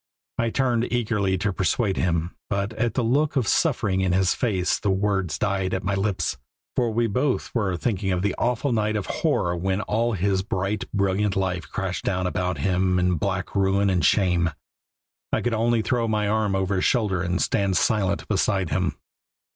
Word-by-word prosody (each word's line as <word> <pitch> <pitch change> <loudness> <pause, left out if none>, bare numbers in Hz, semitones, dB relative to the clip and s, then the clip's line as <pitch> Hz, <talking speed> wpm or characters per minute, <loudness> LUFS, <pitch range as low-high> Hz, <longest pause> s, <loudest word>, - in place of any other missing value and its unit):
I 115 0 +2
turned 120 -1 0
eagerly 105 -5 0
to 100 +2 -1
persuade 95 +2 0
him, 85 -1 0
but 100 +2 -1
at 115 -1 -1
the 125 - +1
look 145 +6 +1
of 125 -6 +1
suffering 105 - +1
in 95 -2 +1
his 95 0 +3
face 95 -7 0
the 100 - -1
words 95 -3 0
died 95 -3 0
at 95 - -3
my 100 +2 -1
lips, 95 -8 -1 0.4
for 120 -2 +1
we 115 +2 +1
both 125 +5 -1
were 100 -7 0
thinking 95 -1 -1
of 90 0 0
the 100 -2 +1
awful 125 +3 0
night 110 -2 0
of 105 - -2 0.2
horror 85 0 +1
when 95 +3 -1
all 115 +3 0
his 95 0 +1
bright, 95 +1 -2
brilliant 100 0 +1
life 90 -4 -2
crashed 95 -2 -3
down 95 -1 -1
about 90 -1 -1
him 90 +4 +1
in 90 -1 +2
black 95 +1 -2
ruin 100 0 +2
and 90 -3 +1
shame. 90 -2 +3 0.8
I - - +1
could 120 - -1
only 115 0 +2
throw 120 -1 0
my 105 -1 0
arm 105 -2 +1
over 95 0 0
his 90 - +1
shoulder 105 -7 +1
and 90 +1 -1
stand 95 -2 +1
silent 100 -3 +1
beside 95 -3 0
him. - - 0
100 Hz, 185 wpm, -24 LUFS, 95-110 Hz, 0.8 s, his